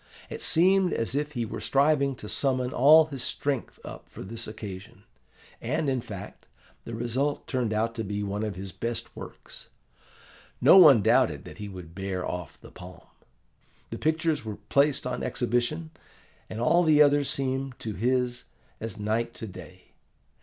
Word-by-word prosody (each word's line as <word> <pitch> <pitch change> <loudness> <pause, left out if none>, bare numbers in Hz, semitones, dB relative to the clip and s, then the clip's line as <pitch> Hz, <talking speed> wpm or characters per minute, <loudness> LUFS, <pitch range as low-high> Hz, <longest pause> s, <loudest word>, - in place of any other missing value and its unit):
It - - -6
seemed 185 +2 +4
as 115 +1 -1
if 150 +1 -2
he 120 -3 -2
were 110 - -6
striving 140 -1 +2
to 105 - -10
summon 130 +1 0
all 155 +5 +7
his 140 -4 -7
strength 140 -1 -3
up - - -10
for - - -9
this 115 +4 -5
occasion. 105 -3 -9 0.6
And, 140 +3 -1
in 130 -2 -1
fact, 105 -5 -10 0.4
the 115 - -6
result 125 +5 -2
turned 125 -5 -1
out 110 +2 0
to 115 -1 -4
be 105 0 -3
one 100 +1 -3
of 105 -3 -3
his 95 +1 -7
best 115 +4 -5
works. - - -10 0.9
No - - +7
one 145 - +8
doubted - - +3
that - - -11
he 105 -1 -6
would 90 -4 -10
bear 95 -1 -4
off 90 -3 -6
the - - -14
palm. 90 0 -12 0.9
The - - -5
pictures 160 -1 0
were 110 -2 -5
placed 140 -1 +2
on 125 -1 -3
exhibition, 120 +7 -1 0.6
and 110 - -6
all 170 +9 +4
the 155 -3 +4
others 145 -1 +4
seemed 135 -1 -2
to 110 - -4
his 125 +3 -1 0.3
as 115 -1 -5
night 110 +3 -2
to - - -7
day. 90 -2 -12
120 Hz, 165 wpm, -27 LUFS, 105-140 Hz, 0.9 s, one